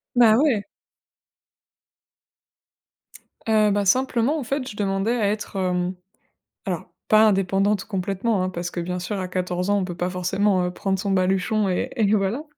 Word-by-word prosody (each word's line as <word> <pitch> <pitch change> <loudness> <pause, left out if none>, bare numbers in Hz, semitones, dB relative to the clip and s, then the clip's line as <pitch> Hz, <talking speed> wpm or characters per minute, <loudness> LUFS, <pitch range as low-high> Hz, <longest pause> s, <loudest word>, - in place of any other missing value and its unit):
Bah 230 -3 +6
ouais. 250 -6 +2 2.8
Heu, 215 -1 +4
bah, 205 0 +1
simplement, 255 +6 +2
en 285 - -4
fait, 265 +1 -3
je 205 - -9
demandais 200 +3 0
à 215 -4 +1
être, 210 -1 -4
hem, 180 -1 -1 0.7
alors 180 -4 -3 0.2
pas 215 0 +6
indépendante 195 0 +1
complètement, 195 +1 -1
hein, 185 - -1
parce 175 -1 -4
que, - - -5
bien 180 +1 -3
sûr, 195 +3 -4
à 185 - -3
14 180 0 -2
ans, 205 - +3
on 190 - -1
peut 175 -1 -6
pas 175 +1 -2
forcément, 185 +1 +1
heu, 180 - -2
prendre 190 +1 -2
son 200 +1 -2
baluchon 195 +2 +1
et 180 - -1
et 215 -4 +2
voilà. 210 +7 0
195 Hz, 165 wpm, -23 LUFS, 185-215 Hz, 2.8 s, Bah